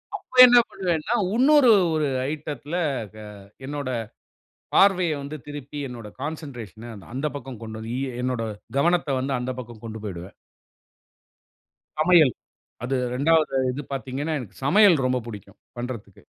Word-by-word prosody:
அப்ப 255 - +4
என்ன 245 -1 +7
பண்ணுவேன்னா, 175 +1 -1 0.2
இன்னொரு 270 +1 +6 0.3
ஒரு 155 -2 +1 0.2
ஐட்டத்துல 150 0 -5 0.4
க - - -12 0.5
என்னோட 145 -1 -4 0.8
பார்வையை 185 -5 +4
வந்து 140 +2 -6
திருப்பி 145 0 -8
என்னோட 120 -3 -9
கான்சென்ட்ரேஷன்ன 120 - -7 0.2
அந்த 135 +4 -1
பக்கம் 130 -4 -8
கொண்டு 110 0 -7
வந்து, 110 +1 -6 0.2
எ - - -6
என்னோட 125 -2 -1 0.4
கவனத்தை 170 -2 +2
வந்து 135 +1 -2
அந்த 125 +1 -3
பக்கம் 120 -3 -10
கொண்டு 110 -1 -6
போய்டுவேன். 95 -2 -7 1.6
சமையல். 155 -5 +5 0.5
அது 130 +2 -1 0.2
2வது 155 +2 +2 0.2
இது 135 +3 -5
பார்த்தீங்கன்னா, 135 +4 -3
எனக்கு 120 -6 -10
சமையல் 200 +4 +6
ரொம்ப 130 0 +1
பிடிக்கும் 105 -4 -10 0.2
பண்ணுறதுக்கு. 120 -5 -7
140 Hz, 130 wpm, -24 LUFS, 120-160 Hz, 1.6 s, என்ன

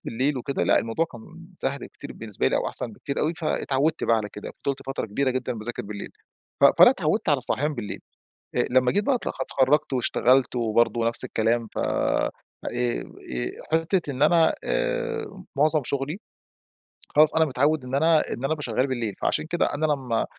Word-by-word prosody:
بالليل 130 +4 -1
وكده 135 +2 -2
لأ - - +4
الموضوع 115 +8 0
كان 165 +8 -12
سهل 140 -3 -3
كتير 140 - -10
بالنسبة 110 -3 -3
لي - - +1
أو - - -1
أحسن - - -4
بكتير 140 - -4
أوي، 160 +3 0
فاتعودت 155 -2 0
بقى 115 - +3
على 105 -2 -2
كده 105 - -8
فضلت 140 -1 -1
فترة 135 -4 -3
كبيرة 130 +6 0
جدًا 130 -1 -2
باذاكر 115 +2 -5
بالليل. 100 0 -7 0.5
ف - - +9
فأنا - - +10
اتعودت - - 0
على - - +4
الصحيان 150 +2 0
بالليل 115 -5 -5 0.5
آآ، - - +2
لمّا 125 0 +3
جيت 205 +2 +1
بقى 275 - +2
أ - - +1
اتخرجت 135 +2 +2
واشتغلت 125 0 +2
وبرضو 115 0 +2
نفس 115 0 -1
الكلام 115 +1 0
ف - - -4
آآ، - - +1 1.4
حتّة 165 0 +1
إن 130 +1 -3
أنا 165 +1 +5
آآ، 475 - -2
معظم 155 +1 +3
شغلي 140 +7 -2 0.9
خلاص 155 +1 +4
أنا 160 0 +5
متعوّد 145 +1 +1
إن 125 +1 -5
أنا 160 +2 +4
إن - - -4
أنا 135 - -2
بابقي 155 -1 -2
شغّال 125 +1 0
بالليل، 120 -6 -2
فعشان - - 0
كده 175 - +2
أنا 155 +2 +1
لمّا 130 -6 0
135 Hz, 180 wpm, -25 LUFS, 120-155 Hz, 1.4 s, فأنا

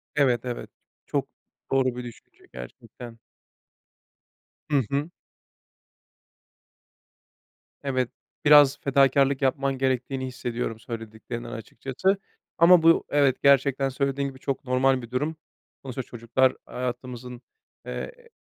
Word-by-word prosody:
Evet, 125 -5 +3
evet. 120 -1 -5 0.4
Çok - - -1 0.4
doğru 130 -2 +2
bir 125 - -5
düşünce 120 -2 -13
gerçekten. 115 - -10 1.5
Hı 140 -2 +4
hı. 145 +4 -1 2.7
Evet, 130 -3 0 0.4
biraz 145 -2 +7
fedakârlık 140 0 +3
yapman 135 0 +1
gerektiğini 130 0 -1
hissediyorum 120 -3 -4
söylediklerinden 115 +1 -7
açıkçası 135 - -2 0.4
ama 170 0 +7
bu 165 0 +5
evet, 140 -3 +2
gerçekten 135 0 +4
söylediğin 140 +1 -1
gibi 130 -1 -9
çok 135 -1 -3
normal 130 0 +2
bir 120 0 -11
durum. 150 +5 -1 0.5
Sonuçta 130 -1 -5
çocuklar 120 +2 +1
hayatımızın, 125 0 -6 0.4
eee, 485 -1 -7
130 Hz, 100 wpm, -26 LUFS, 125-140 Hz, 2.7 s, biraz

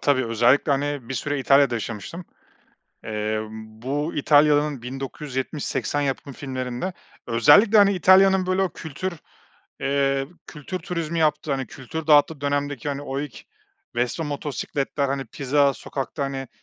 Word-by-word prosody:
tabii 130 -3 +2
özellikle, 120 +6 +3
hani, 140 -3 -2
bir 135 - -3
süre 145 +1 -2
İtalya'da 135 -1 +4
yaşamıştım. 115 - -5 0.8
Eee, 110 0 -2
bu 115 +8 -4
İtalya'nın 145 -2 +3
1970-80 135 +2 -3
yapım 140 0 -3
filmlerinde 130 +5 -4 0.3
özellikle, 145 - +6
hani, 200 -1 +6
İtalya'nın 190 +1 +5
böyle 185 +1 +1
o 190 - +1
kültür, 165 +4 -5 0.7
eee, 135 0 +1 0.2
kültür 160 +5 -6
turizmi 170 -2 -3
yaptığı, 150 -1 +1
hani, 135 -1 -2
kültür 155 +5 -7
dağıttığı 150 0 +4
dönemdeki, 145 -1 -2
hani, 140 0 -3
o 135 -1 -3
ilk 145 -6 -7 0.5
Vespa 125 +7 -1
motosikletler, 145 -1 -2
hani, 135 0 -2
pizza 140 +3 +2
sokakta, 140 +1 -4
hani, 135 -2 -4
140 Hz, 130 wpm, -24 LUFS, 130-150 Hz, 0.8 s, özellikle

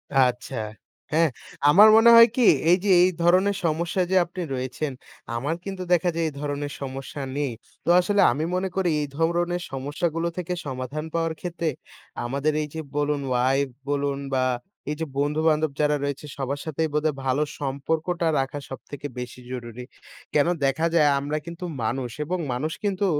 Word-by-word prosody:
আচ্ছা, 125 0 +2 0.6
হ্যাঁ। 160 +1 +4 0.4
আমার 205 +8 +9
মনে 230 +1 +7
হয় 230 0 +10
কি? 250 -3 +3 0.3
এইযে 190 +3 +2
এই 185 - +5
ধরনের 185 +4 +4
সমস্যায় 170 +3 0
যে 190 - +3
আপনি 180 +2 -7
রয়েছেন, 130 +3 -3 0.4
আমার 145 +7 -1
কিন্তু 190 -2 -5
দেখা 175 +1 +3
যায় 165 - 0
এই 155 - -5
ধরনের 145 0 -3
সমস্যা 135 +1 -6 0.2
নেই। 145 -4 0 0.3
তো - - -1
আসলে 200 +3 +2
আমি 150 +5 -2
মনে 185 +1 0
করি 190 -2 +1
এই 145 - -2
ধরণের 175 +2 +1
সমস্যাগুলো 150 +5 -2
থেকে 180 0 -2
সমাধান 135 +3 -4
পাওয়ার 165 -1 0
ক্ষেত্রে, 170 -2 -2 0.6
আমাদের 140 +5 0
এই 150 - -3
যে 160 - -4
বলুন 145 -1 0
wife 130 +2 +2 0.2
বলুন 140 -1 0
বা 130 -1 +2 0.5
এই 150 - -1
যে - - 0
বন্ধু-বান্ধব 155 +1 +2
যারা 150 0 +3
রয়েছে, 140 +1 -3
সবার 140 +1 -2
সাথেই 160 +1 -1
বোধহয় 150 -1 +1
ভালো 130 +2 +1 0.2
সম্পর্কটা 160 +5 -1
রাখা 135 +2 -2
সবথেকে 145 +2 -7
বেশি 125 0 -7
জরুরি। 120 -1 -6 0.5
কেনো? 150 +4 +3
দেখা 135 +5 +1
যায় 150 -3 +5
আমরা 145 +2 -2
কিন্তু 170 +1 -8 0.2
মানুষ 125 +2 -1 0.2
এবং 180 +4 -1 0.2
মানুষ 150 +6 -2
কিন্তু 200 -1 0
150 Hz, 165 wpm, -25 LUFS, 135-170 Hz, 0.6 s, হয়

